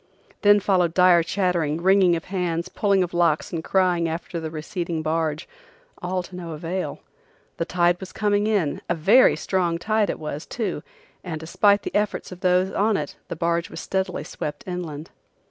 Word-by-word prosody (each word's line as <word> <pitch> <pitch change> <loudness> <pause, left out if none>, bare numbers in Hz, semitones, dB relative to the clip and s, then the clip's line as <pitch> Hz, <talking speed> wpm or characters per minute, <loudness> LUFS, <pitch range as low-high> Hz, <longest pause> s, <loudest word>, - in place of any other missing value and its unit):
Then 205 -1 +6
followed 180 -4 +1
dire 180 -2 +6
chattering, 170 -3 0
wringing 190 -2 +5
of 165 - -5
hands, 175 -1 -1
pulling 200 -2 +2
of 175 - -5
locks 170 -2 +1
and 165 -1 -3
crying 180 -3 +2
after 170 +1 -4
the 160 -1 -4
receding 165 +1 -4
barge, 155 0 -1 0.5
all 180 +1 -2
to 180 - -11
no 170 -2 -6
avail. 165 0 -4 0.6
The 165 - -1
tide 175 0 +2
was 190 - -8
coming 205 -1 +1
in, 195 -10 0
a 175 - +2
very 205 +11 +5
strong 175 -3 0
tide 215 +3 +1
it - - -2
was, 150 0 -6
too, 200 -10 -3 0.4
and 160 -4 -5
despite 200 +5 +2
the - - -5
efforts 205 -2 -1
of 180 - -9
those 185 +1 +2
on 210 +1 +1
it 145 - -5
the - - -5
barge 170 +1 -1
was - - -8
steadily 190 -1 -2
swept 150 -1 -6
inland. 170 -4 -6
175 Hz, 180 wpm, -23 LUFS, 165-190 Hz, 0.6 s, Then